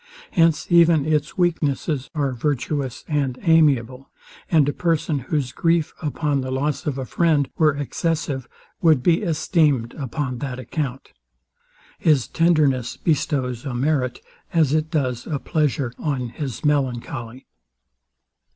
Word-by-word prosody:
Hence 165 Hz, -2 st, +3 dB
even 170 Hz, -4 st, +5 dB
its 155 Hz, -1 st, 0 dB
weaknesses 155 Hz, -5 st, 0 dB
are 140 Hz, -3 st, 0 dB
virtuous 135 Hz, 0 st, -2 dB
and 140 Hz, -5 st, -1 dB
amiable; 135 Hz, -6 st, +3 dB, 0.4 s
and 155 Hz, -4 st, +4 dB
a 145 Hz, -, 0 dB
person, 165 Hz, -3 st, 0 dB
whose 130 Hz, 0 st, -2 dB
grief 165 Hz, +2 st, +1 dB
upon 145 Hz, -2 st, -1 dB
the 130 Hz, -, -4 dB
loss 140 Hz, +4 st, -2 dB
of 140 Hz, -2 st, -1 dB
a 130 Hz, -, -3 dB
friend 155 Hz, -2 st, +2 dB
were 155 Hz, -3 st, +3 dB
excessive, 145 Hz, -2 st, -2 dB, 0.3 s
would 155 Hz, -6 st, +4 dB
be 170 Hz, +2 st, +3 dB
esteemed 155 Hz, -, +1 dB
upon 135 Hz, -2 st, -4 dB
that 135 Hz, -3 st, -4 dB
account. 135 Hz, 0 st, -5 dB, 0.9 s
His 150 Hz, -7 st, +3 dB
tenderness 150 Hz, -7 st, +2 dB
bestows 135 Hz, -6 st, -1 dB
a 135 Hz, -4 st, -4 dB
merit, 130 Hz, -2 st, 0 dB, 0.3 s
as 160 Hz, -6 st, +3 dB
it 155 Hz, 0 st, +1 dB
does 130 Hz, -7 st, -1 dB
a 155 Hz, -, -1 dB
pleasure, 140 Hz, -4 st, -1 dB
on 130 Hz, -5 st, -2 dB
his 135 Hz, 0 st, -6 dB
melancholy. 130 Hz, -3 st, -2 dB
145 Hz, 130 wpm, -22 LUFS, 130-155 Hz, 0.9 s, even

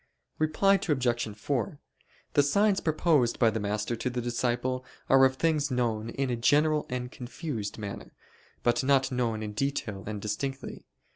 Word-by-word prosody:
Reply 195 Hz, +6 st, +3 dB
Obj. 120 Hz, -6 st, 0 dB
4: 140 Hz, -, -2 dB, 0.5 s
The 145 Hz, -, +5 dB
signs 200 Hz, +8 st, +3 dB
proposed 155 Hz, -6 st, +2 dB
by 115 Hz, -3 st, +4 dB
the 110 Hz, -, -2 dB
master 105 Hz, +3 st, -1 dB
to 125 Hz, -, -2 dB
the 125 Hz, 0 st, -3 dB
disciple 120 Hz, +1 st, -1 dB, 0.3 s
are 135 Hz, 0 st, +7 dB
of 130 Hz, 0 st, +2 dB
things 150 Hz, -1 st, +1 dB
known 115 Hz, -3 st, -1 dB
in 135 Hz, 0 st, -2 dB
a -, -, +1 dB
general 150 Hz, +5 st, +3 dB
and 125 Hz, -1 st, -4 dB
confused 120 Hz, -, -5 dB
manner; 100 Hz, -2 st, -7 dB, 0.5 s
but 120 Hz, +1 st, +2 dB
not 135 Hz, -1 st, +3 dB
known 115 Hz, -4 st, -1 dB
in 105 Hz, -1 st, -5 dB
detail 105 Hz, -5 st, -2 dB
and 105 Hz, -1 st, -4 dB
distinctly. 135 Hz, +7 st, -4 dB
125 Hz, 155 wpm, -28 LUFS, 115-145 Hz, 0.5 s, are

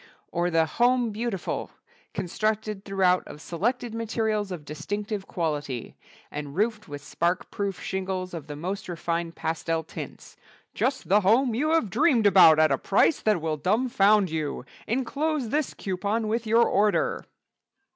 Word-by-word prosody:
Or 175 Hz, 0 st, 0 dB
the 165 Hz, -1 st, +3 dB
"Home 240 Hz, +6 st, +2 dB
Beautiful," 210 Hz, -3 st, -3 dB, 0.4 s
constructed 215 Hz, +2 st, -2 dB
throughout 190 Hz, -2 st, +2 dB
of 145 Hz, -, -10 dB
selected 230 Hz, +9 st, -2 dB
materials 220 Hz, -3 st, -1 dB
of 165 Hz, -5 st, -6 dB
distinctive 200 Hz, +7 st, -4 dB
quality, 145 Hz, -7 st, -3 dB, 0.4 s
and 145 Hz, -1 st, -6 dB
roofed 215 Hz, +2 st, 0 dB
with 145 Hz, -1 st, -8 dB
spark 175 Hz, +4 st, -1 dB
proof 200 Hz, -3 st, -3 dB
shingles 190 Hz, -1 st, -3 dB
of 160 Hz, -3 st, -6 dB
the 145 Hz, -, -6 dB
most 185 Hz, +6 st, -5 dB
refined 170 Hz, 0 st, -3 dB
pastel 165 Hz, 0 st, -2 dB
tints, -, -, -9 dB, 0.4 s
"_just 265 Hz, 0 st, 0 dB
the 205 Hz, +3 st, +3 dB
home 230 Hz, +6 st, +3 dB
you 290 Hz, +7 st, 0 dB
have 275 Hz, -, +1 dB
dreamed 250 Hz, -, +3 dB
about 185 Hz, -6 st, +8 dB
at 155 Hz, -1 st, +4 dB
a 135 Hz, -, +1 dB
price 205 Hz, +9 st, +2 dB
that 210 Hz, -6 st, +2 dB
will 155 Hz, -1 st, -1 dB
dumfound 205 Hz, -, +3 dB
you! 155 Hz, -5 st, -3 dB, 0.2 s
Enclose 265 Hz, +2 st, -1 dB
this 295 Hz, +3 st, -1 dB
coupon 200 Hz, +3 st, -2 dB
with 225 Hz, +1 st, -1 dB
your 230 Hz, +2 st, +5 dB
order. 205 Hz, +1 st, +1 dB
195 Hz, 145 wpm, -26 LUFS, 165-225 Hz, 0.4 s, about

